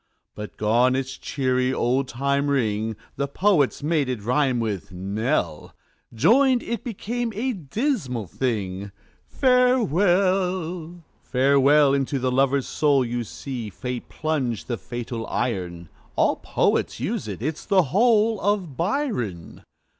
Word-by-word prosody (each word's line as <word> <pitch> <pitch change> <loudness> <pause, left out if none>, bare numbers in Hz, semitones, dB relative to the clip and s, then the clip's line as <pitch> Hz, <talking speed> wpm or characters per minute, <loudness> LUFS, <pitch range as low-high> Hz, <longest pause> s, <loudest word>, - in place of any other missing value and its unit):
But 105 -3 -8
gone 120 +4 +3
its 130 0 -3
cheery, 130 -2 0
old 130 +1 0
time 140 +3 0
ring; 110 -5 0 0.2
The 140 +1 -1
poets 150 -3 +2
made 150 -3 +1
it 120 -5 -3
rhyme 125 +1 +1
with 100 -3 -3
knell 95 - -2 0.4
Joined 250 - +4
it 235 -3 -4
became 235 +1 -3
a 250 +5 -1
dismal 170 - -2
thing 100 -1 -3 0.4
"Farewell!" 185 - +1 0.2
"Farewell!" 140 +2 +4
into 140 0 0
the 130 0 0
lover's 135 +1 +2
soul 140 -4 +2
You 120 0 -2
see 120 0 -6
Fate 125 +3 -6
plunge 140 -8 -2
the 120 - -3
fatal 120 -1 -5
iron. 90 -7 -3 0.3
All - - +2
poets - - 0
use - - -2
it. - - -6
It's 155 +2 -3
the 195 -3 +4
whole 215 - +3
Of 195 -8 0
Byron. 170 - -2
135 Hz, 125 wpm, -24 LUFS, 120-185 Hz, 0.4 s, Joined